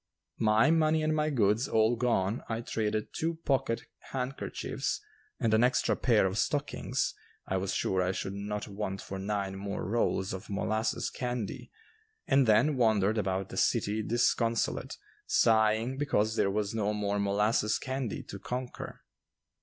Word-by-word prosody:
My 110 +6 +4
money 160 -1 +3
and 155 0 +1
my 155 0 +1
goods 115 -2 +2
all 110 +2 +3
gone 115 -3 0
I 115 0 -2
traded 110 -2 -2
two 165 +1 -1
pocket 130 -4 +1 0.3
handkerchiefs 130 0 -3 0.4
and 115 -1 +1
an 110 +2 +5
extra 125 +1 +2
pair 115 -6 +3
of 95 +2 -1
stockings - - -1 0.3
I 95 - -1
was 95 0 -2
sure 95 -1 +1
I 90 0 +1
should 95 0 -4
not 105 +1 -4
want 100 -1 -4
for 95 0 -6
nine 100 -1 -2
more 100 -1 -4
rolls 100 -3 0
of 95 +3 -7
molasses 110 +3 -1
candy, 125 -4 -4 0.6
and 135 -2 +4
then 120 +7 +4
wandered 110 -2 +3
about 95 -1 -1
the - - -7
city 105 +2 +1
disconsolate, 115 0 0 0.3
sighing 110 +3 +3
because 110 -7 +1
there 100 - +2
was 105 +1 -1
no 105 -2 0
more 105 -1 -1
molasses 105 +2 +2
candy 130 -4 -3
to 100 - -8
conquer. 125 +5 -6
110 Hz, 150 wpm, -30 LUFS, 100-125 Hz, 0.6 s, an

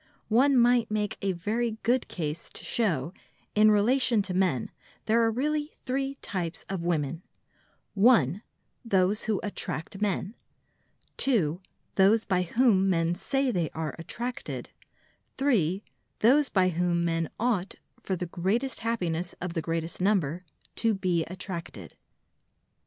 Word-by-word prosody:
One 260 +5 +4
might 240 -1 +4
make 210 -1 -1
a 195 - +1
very 220 +6 -2
good 245 +2 +2
case 160 -1 -4
to - - -6
show 170 - 0
that, - - -27 0.4
in 215 - +8
relation 225 +1 +3
to 190 - -3
men, 180 -10 +1 0.3
there 225 +2 +3
are 225 - +3
really 295 +6 -1
three 270 +1 -1
types 175 -3 -4
of 190 -3 -4
women: 160 -2 -1 0.7
(1) 205 - +4 0.4
those 200 -1 +2
who 215 -3 0
attract 195 -1 -4
men, 200 0 -1 0.8
(2) 185 - +2 0.4
those 205 +3 +5
by 185 -2 +1
whom 195 0 +3
men 165 -2 +2
say 270 +8 0
they 175 -7 0
are 160 -1 -3
attracted, 240 +9 -5 0.7
(3) 205 - +1 0.4
those 275 +5 +5
by 185 -2 +3
whom 175 0 0
men 165 -1 0
ought 215 -5 0 0.3
(for 190 - -2
the 180 - -3
greatest 195 +10 -1
happiness 180 -7 -2
of 180 -1 -4
the 165 - -1
greatest 165 +2 -3
number) 180 -4 +1 0.3
to 225 -2 +2
be 180 -4 0
attracted. 170 - -7
195 Hz, 135 wpm, -28 LUFS, 170-230 Hz, 0.8 s, in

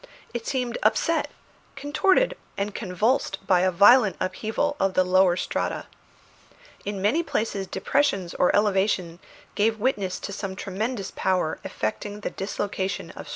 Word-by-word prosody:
It 240 -1 -5
seemed 250 -3 -2
upset, 220 +10 +2 0.5
contorted, 335 - +2 0.2
and 200 +1 -2
convulsed 205 +2 0
by 185 -2 +4
a 185 +1 +3
violent 205 +4 +6
upheaval 220 +10 -1
of 195 -1 +1
the 185 - +5
lower 180 -1 +4
strata. - - -2 1.0
In 200 -1 -4
many 265 +12 +3
places 215 - -2
depressions 195 -4 0
or 180 - +2
elevations 190 -4 +1 0.3
gave 220 +1 +1
witness 205 -6 -1
to 200 - -5
some 195 -1 -5
tremendous 200 +2 -3
power 185 -4 0
effecting 205 - -4
the - - -3
dislocation 195 0 -3
of - - -10
strata. - - -10
205 Hz, 140 wpm, -25 LUFS, 190-235 Hz, 1.0 s, violent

